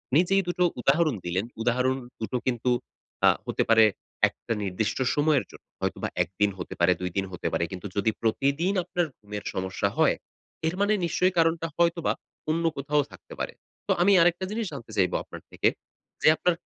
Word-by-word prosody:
নিজেই 185 +5 +4
দুটো 175 0 +1 0.2
উদাহরণ 150 +2 +3
দিলেন। 90 +4 -1 0.2
উদাহরণ 125 +2 +2 0.2
দুটো 115 +3 -2
কিন্তু 125 0 0 0.6
আ - - +9 0.2
হতে - - +1
পারে 115 -1 +7 0.5
একটা 115 - -5
নির্দিষ্ট 100 +2 -1 0.2
সময়ের 145 -1 +3
জন্য। - - -15 0.2
হয়তোবা - - -1 0.2
১ 85 - -12
দিন 105 0 +4
হতে 90 - -5
পারে 90 +1 +5
২ 90 - -1
দিন 95 - +1
হতে 90 - -4
পারে। - - +1
কিন্তু 95 +2 -6
যদি 105 +2 +2
প্রতিদিন 140 - +1
আপনার 175 0 0
ঘুমের 105 -1 -7
সমস্যা 95 0 -1
হয়, - - +4 0.5
এর 165 - -1
মানে 205 +1 +3
নিশ্চয়ই 180 +3 +2
কারণটা 165 0 +2
হয়তোবা 170 -1 +2 0.4
অন্য 165 +2 +1
কোথাও 145 +2 +1
থাকতে - - -13
পারে। - - -3 0.3
তো - - +2
আমি 200 +3 +5
আরেকটা 175 +2 +3
জিনিস 225 +1 -2
জানতে 125 -5 -8
চাইব 95 -2 +3
আপনার - - -10
থেকে। - - +2 0.5
যে - - +4
আপনার 180 - +2
140 Hz, 175 wpm, -27 LUFS, 105-170 Hz, 0.6 s, আ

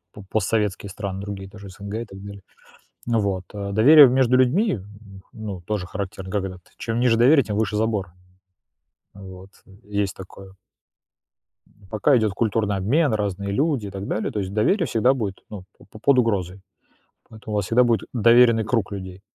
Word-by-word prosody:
по 105 - -11
постсоветские 105 -2 -1
страны 95 -1 -5
другие, 100 -1 -7
даже 100 0 -11
СНГ 100 +2 -8
и 115 - -4
так 95 -1 -12
далее. 100 -1 -10 0.6
Ну 115 -1 +1
вот. 95 -3 -2
А 100 -1 -5
доверие 140 +8 +8
в 125 - +2
между 130 -1 +3
людьми 130 - +2
в - - -9
м, 100 -1 -15
ну, 105 -5 -7
тоже 100 0 -3
характерно: 95 -1 -6
когда 95 -2 -3
ты 90 - -23
чем 115 0 -2
ниже 120 -2 +3
доверие, 135 +4 +5
тем 105 - -4
выше 105 -1 -1
забор. 105 -5 -1 1.0
Вот, 95 -1 -12 0.2
э, - - -20
есть 100 -2 -2
такое. 95 0 -12 1.1
М, 100 -2 -23
пока 120 +6 +3
идёт 110 -3 +1
культурный 105 -1 0
обмен, 130 - +1
разные 100 -2 -3
люди 140 -3 0
и - - -7
так 100 0 -7
далее, 110 - -2
то 105 - -4
есть 95 0 -5
доверие 170 - +1
всегда 125 +2 +2
будет, 105 -7 -4
ну, 100 -4 -8
по - - -17
по - - -14
под 135 +4 +3
угрозой, 100 -6 0 0.7
поэтому 110 -1 -8
у - - 0
вас 100 -2 -1
всегда 125 +2 +4
будет 115 -2 0
доверенный 115 -1 +5
круг 110 -2 -1
людей. 95 -1 -8
105 Hz, 190 wpm, -22 LUFS, 95-115 Hz, 1.1 s, доверие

